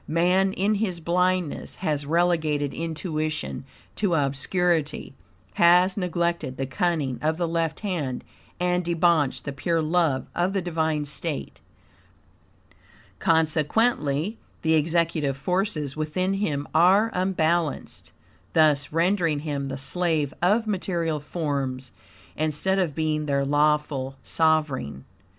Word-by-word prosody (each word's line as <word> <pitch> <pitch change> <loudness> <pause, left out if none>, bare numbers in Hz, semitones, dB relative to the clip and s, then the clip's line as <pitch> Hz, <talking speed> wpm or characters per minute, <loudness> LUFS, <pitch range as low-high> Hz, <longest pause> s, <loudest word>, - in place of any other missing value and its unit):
Man, 180 +4 +2
in 200 +3 +1
his 200 -5 -1
blindness, 180 0 0
has 150 -5 -2
relegated 160 -4 +1
intuition 155 -3 -3 0.3
to 195 -5 +1
obscurity; 150 +2 0 0.4
has 180 +2 +5
neglected 170 -7 -1
the 135 - -1
cunning 135 -1 -1
of 155 +1 0
the 175 -1 0
left 165 -1 -1
hand 160 -11 -3 0.4
and 180 0 +1
debauched 170 -4 +2
the 140 - -4
pure 165 +4 0
love 160 -4 +1
of 180 +2 0
the 195 - 0
divine 160 -3 -1
state. 150 +1 -6 1.6
Consequently, 160 - +1 0.2
the 160 0 +3
executive 160 -3 +1
forces 155 -3 -1
within 170 +5 -1
him 155 -8 -2
are 195 +7 +5
unbalanced, 175 -4 -1 0.4
thus 150 -3 +3
rendering 165 -2 +1
him 145 -3 -3
the 135 0 -4
slave 155 -1 0
of 210 +6 +3
material 175 -6 -1
forms, 140 -4 -3 0.4
instead 155 +5 0
of 165 -7 0
being 155 -1 -1
their 140 -1 +1
lawful 145 -2 +1
sovereign. 150 - 0
160 Hz, 115 wpm, -25 LUFS, 145-180 Hz, 1.6 s, has